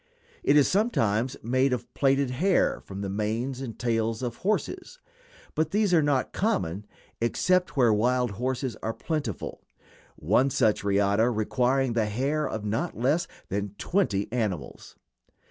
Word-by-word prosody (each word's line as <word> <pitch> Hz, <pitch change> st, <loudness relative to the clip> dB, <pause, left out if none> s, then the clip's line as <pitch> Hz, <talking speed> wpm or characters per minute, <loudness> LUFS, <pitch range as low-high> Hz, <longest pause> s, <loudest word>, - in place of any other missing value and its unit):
It 145 Hz, -, +4 dB
is 145 Hz, -, +5 dB
sometimes 130 Hz, -, +1 dB
made 130 Hz, +3 st, +2 dB
of 120 Hz, -1 st, -5 dB
plaited 135 Hz, -1 st, +2 dB
hair 180 Hz, +9 st, +2 dB
from 100 Hz, 0 st, -8 dB
the 100 Hz, -, -3 dB
manes 110 Hz, +6 st, -2 dB
and 120 Hz, -4 st, -6 dB
tails 115 Hz, 0 st, -1 dB
of 120 Hz, -2 st, -3 dB
horses, 365 Hz, -, -2 dB, 0.6 s
but 155 Hz, 0 st, 0 dB
these 205 Hz, 0 st, +1 dB
are 165 Hz, -, +6 dB
not 145 Hz, -3 st, 0 dB
common 105 Hz, -, -1 dB, 0.3 s
except 180 Hz, +9 st, +1 dB
where 120 Hz, -4 st, +5 dB
wild 125 Hz, +2 st, +1 dB
horses 125 Hz, +2 st, -2 dB
are 115 Hz, -, -3 dB
plentiful, 150 Hz, -, -4 dB, 0.5 s
one 110 Hz, -, +2 dB
such 110 Hz, -6 st, +2 dB
riata 100 Hz, +3 st, +2 dB
requiring 125 Hz, +3 st, +1 dB
the 115 Hz, -2 st, +1 dB
hair 140 Hz, +7 st, -1 dB
of 110 Hz, -1 st, -4 dB
not 115 Hz, +11 st, -2 dB
less 140 Hz, +8 st, +1 dB, 0.2 s
than 100 Hz, +1 st, -3 dB
twenty 135 Hz, -, 0 dB
animals. 105 Hz, -, -3 dB
125 Hz, 145 wpm, -27 LUFS, 110-145 Hz, 0.6 s, are